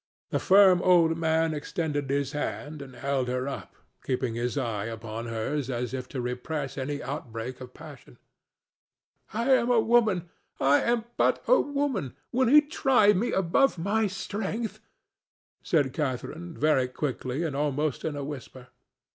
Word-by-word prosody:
The - - +1
firm 190 -2 +6
old 170 -3 +4
man 160 0 +1
extended 150 -2 -3
his 140 -1 0
hand 150 0 -4
and 130 -2 -10
held 135 0 -1
her 125 +1 -2
up, 140 - -6 0.3
keeping 125 -2 -1
his 120 +4 -2
eye 115 -6 -2
upon 115 0 -6
hers 120 +5 -2
as 125 -1 -3
if 130 -1 -5
to 135 - -5
repress 125 +4 -4
any 145 +1 -3
outbreak 125 -2 -6
of 125 0 -10
passion. 145 - -13 1.1
"I 235 +5 0
am 245 -1 +3
a 245 -2 +5
woman—I 190 - +1
am 235 -1 +1
but - - +2
a - - +6
woman; 280 - -2 0.2
will 255 +1 +2
He 295 +5 +8
try 265 -8 +3
me 220 +6 0
above 190 +7 +2
my 205 +5 +1
strength?" 205 +3 -4 0.8
said 145 -6 +1
Catharine, 155 +4 -4
very 150 -4 +3
quickly 130 +2 -3
and 155 -5 -2
almost 145 -1 -1
in 155 - -2
a 145 - -4
whisper. 130 -3 -9
150 Hz, 150 wpm, -27 LUFS, 130-190 Hz, 1.1 s, He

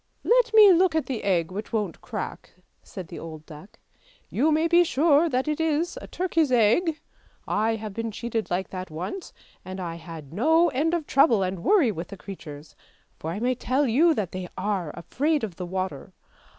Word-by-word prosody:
" - - -43 0.2
Let 475 -2 +1
me 420 -3 +9
look 355 -1 +3
at 315 - +1
the 255 -5 -4
egg 180 -4 +1
which 205 +3 -6
won't 210 -7 -2
crack," 215 -5 -6 0.3
said 185 -3 -9
the - - -8
old 155 -1 -9
duck. 155 +6 -13 0.3
" - - -31
You 305 +5 +4
may 315 +2 +2
be 345 +1 +5
sure 315 0 +3
that 260 +1 -1
it 300 0 -1
is 320 +4 0
a - - -9
turkey's 330 -6 0
egg! 255 - +3 0.5
I 220 +2 +1
have 215 -2 -6
been 230 +2 -3
cheated 225 0 -3
like 180 +1 -2
that 185 -1 -6
once, 180 - -6 0.3
and 185 +1 -7
I 170 -2 -5
had 165 -4 -10
no 320 - +4
end 310 +5 0
of 325 -3 -3
trouble 245 -9 +4
and 185 -2 -3
worry 340 - +4
with 170 -3 -6
the 200 - -10
creatures, 155 -7 -10 0.4
for 160 - -5
I 175 +5 -4
may 250 +3 +1
tell 260 +3 0
you 310 +8 +4
that 195 -5 -2
they 185 -1 -6
are 190 -4 -1
afraid 290 - -1
of 190 -7 -5
the 180 - -5
water. 185 +1 -4
225 Hz, 205 wpm, -25 LUFS, -, 0.5 s, me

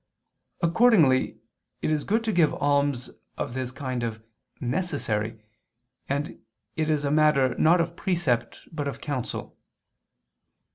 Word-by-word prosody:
Accordingly 170 - +4 0.5
it - - +1
is 150 -1 0
good 225 +3 +1
to 225 - 0
give 170 -6 +3
alms 145 -3 +1 0.3
of - - -3
this 130 -1 -3
kind 130 -2 -4
of 115 -2 -3 0.4
"necessary"; 120 - -2 0.7
and 140 +2 -3 0.3
it 155 0 0
is 150 -2 +1
a 140 - 0
matter 150 -4 +4
not 170 +3 +5
of 170 0 -1
precept 170 - -1
but 150 -3 -3
of 140 - -5
counsel. 145 -6 -4
145 Hz, 130 wpm, -26 LUFS, 130-165 Hz, 0.7 s, not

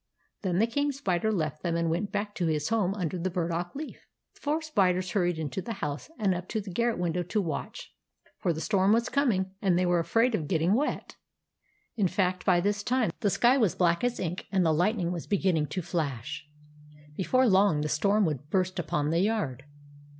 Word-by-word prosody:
Then 180 -4 -1
the 215 - +4
King 285 +5 0
Spider 220 -7 0
left 155 -6 -2
them 170 -2 -1
and 170 0 0
went 185 +5 -2
back 205 0 -2
to 175 -4 -1
his 155 -1 0
home 205 -4 +1
under 180 -2 -3
the 185 +2 -1
burdock 175 +1 -2
leaf. 300 +2 -8 0.3
The - - -23
four 305 +2 -1
spiders 185 - +1
hurried 175 -4 +1
into 160 +4 -3
the 230 - -5
house, 150 - -5
and 200 -5 +2
up 180 0 -5
to 220 - -1
the 200 -2 -7
garret 235 +5 0
window 175 0 -1
to 180 +5 -1
watch; 165 -7 -5 0.5
for 175 - +1
the 160 -1 -4
storm 195 +1 +3
was 235 +2 +1
coming, 210 -10 +1
and 185 -4 +2
they 180 - +2
were 175 -1 +2
afraid 225 +9 +2
of 160 -8 -1
getting 165 +2 +2
wet. 285 +7 -1 0.8
In 205 -5 +2
fact, 185 0 0
by 180 -2 +5
this 200 +2 0
time, 245 +1 +1
the 205 - +1
sky 245 +7 +4
was 215 -8 +2
black 170 +1 +2
as 245 0 0
ink, 175 +1 -4
and 190 -3 +2
the 160 - +3
lightning 180 +2 +1
was 175 -3 -5
begin 190 -2 +2
ning 155 -2 0
to 185 - -4
flash. 150 -4 -3 0.7
Before 255 +9 +2
long 190 -6 +4
the 150 - -1
storm 200 +8 +2
would 150 -2 -3
burst 185 0 0
upon 150 -2 -1
the 165 - +2
yard. 175 - -1
185 Hz, 210 wpm, -28 LUFS, 170-215 Hz, 0.8 s, by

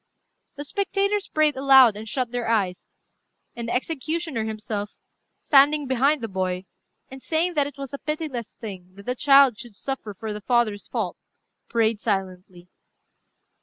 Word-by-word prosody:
The 290 0 -6
spectators 400 +3 -1
prayed 310 -1 +2
aloud, 265 -4 +6
and 215 +1 -7
shut 250 -1 -2
their 245 -1 -3
eyes; 200 -5 0 0.7
and 235 -1 -5
the - - -1
executioner 310 -2 -2
himself, 215 -1 -4 0.4
standing 290 +1 +4
behind 265 +3 +2
the 225 - -3
boy, 185 -2 -2 0.5
and 265 0 -10
saying 335 +5 0
that 290 -3 +1
it 285 -1 -10
was 275 -1 -7
a 280 - -5
pitiless 300 -7 -4
thing 185 -5 -9
that 200 0 -13
the 250 - -1
child 275 -3 +5
should 235 -4 -10
suffer 225 -4 -5
for 220 +2 -5
the 210 - -7
father's 235 -3 0
fault, - - -3 0.5
prayed 225 -2 +1
silently. 185 -4 -3
245 Hz, 155 wpm, -24 LUFS, 210-285 Hz, 0.7 s, aloud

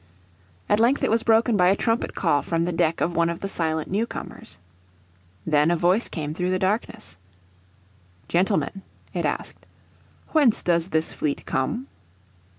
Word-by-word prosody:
At 205 - +2
length 240 +5 +3
it - - +2
was 225 +1 +3
broken 225 0 +3
by 180 -3 +4
a 190 - +4
trumpet 225 +3 -1
call 145 -6 +2
from 165 0 -1
the 180 - -1
deck 165 -1 0
of 170 - 0
one 170 0 +2
of 170 - -5
the 195 - -2
silent 160 -4 -1
new 215 +5 -1
comers. - - -9 0.9
Then 150 0 +3
a 175 - +3
voice 180 +7 +2
came 150 -2 -4
through 180 +2 -2
the 185 - +1
darkness. 190 - -2 1.1
"Gentlemen," 195 +2 0 0.3
it - - -1
asked, - - -4 0.6
"whence 285 -8 +3
does 170 -1 +1
this 160 -3 -1
fleet 145 -2 -3
come?" 235 - -2
180 Hz, 160 wpm, -24 LUFS, 165-215 Hz, 1.1 s, by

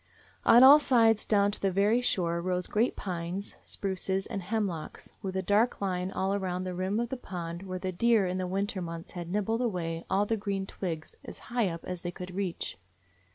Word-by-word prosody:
On 240 +2 +8
all 280 +3 +10
sides 230 -6 +4
down 205 -1 +3
to - - -6
the 195 - +2
very 205 +6 +3
shore 170 -8 0
rose 180 0 -1
great 225 +4 +1
pines, 180 +1 -4
spruces, 190 0 -2
and 195 - -4
hemlocks, 190 -5 -3
with 190 -2 -4
a 190 - -1
dark 210 +6 +2
line 185 -2 -1
all 190 0 -1
around 185 -2 -2
the 185 -1 -4
rim 185 +4 -1
of 235 0 -1
the 265 - -3
pond 170 -6 -6
where 185 -1 -5
the 185 0 -3
deer 225 +2 +3
in 185 +1 -2
the 185 - -2
winter 195 +1 -2
months 165 -1 -6
had 175 -2 -6
nibbled 210 +4 0
away 170 -8 -2
all 195 +2 +2
the 225 +2 0
green 200 -2 -2
twigs 165 -5 -5
as - - -9 0.2
high 235 -6 +2
up 165 -1 -7
as 180 -1 -5
they 175 - -3
could 180 0 -8
reach. 185 - -3
190 Hz, 205 wpm, -29 LUFS, 180-210 Hz, 0.2 s, all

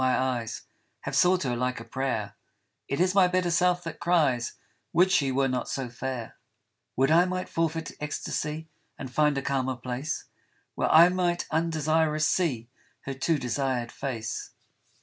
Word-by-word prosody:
my 130 -1 +3
eyes 120 -4 -2 0.4
Have - - -4
sought 180 0 +4
her 125 -3 -1
like 125 +1 -1
a 115 - -9
prayer; 115 -5 -2 0.5
It 140 - -2
is 180 +1 +3
my 190 -2 +6
better 180 -1 +1
self 180 +1 +2
that 165 -2 -6
cries 150 -9 +2 0.2
" - - -46
Would 180 +3 +4
she 140 -7 +3
were 135 +1 +2
not 125 -1 -2
so 135 -3 -3
fair! 125 -1 -5 0.3
" - - -53
Would 135 +3 +3
I 170 +2 +6
might 185 0 -3
forfeit 165 0 -1
ecstasy 150 +1 -3 0.3
And 130 -2 -7
find 150 -1 +3
a 140 - -2
calmer 130 -2 0
place, 125 +5 -4 0.5
Where - - 0
I 170 +2 +8
might 175 -1 0
undesirous 155 -1 +1
see 130 -11 0 0.3
Her 135 - -5
too 150 +4 +1
desired 125 -2 -1
face. 115 -5 -4
140 Hz, 170 wpm, -27 LUFS, 125-170 Hz, 0.5 s, I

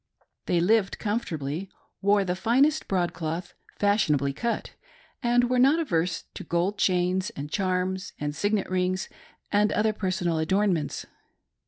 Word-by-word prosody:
They 175 - +2
lived 195 +3 +2
comfortably, 180 -6 -3 0.3
wore 200 0 +3
the 180 -1 -1
finest 265 +10 +2
broadcloth, 175 -2 -2 0.2
fashionably 150 -10 +2
cut, 235 +11 -2 0.5
and 245 -1 +3
were 250 0 +1
not 275 +5 +5
averse 175 - 0
to - - -7
gold 175 +5 -1
chains, 185 0 +1
and 145 +1 -6
charms, 185 0 -1
and 145 0 -3
signet 205 +2 0
rings, 185 0 -1 0.4
and 210 +1 +3
other 215 0 +2
personal 185 -5 -1
adornments. 180 -1 0
190 Hz, 130 wpm, -26 LUFS, 170-210 Hz, 0.5 s, not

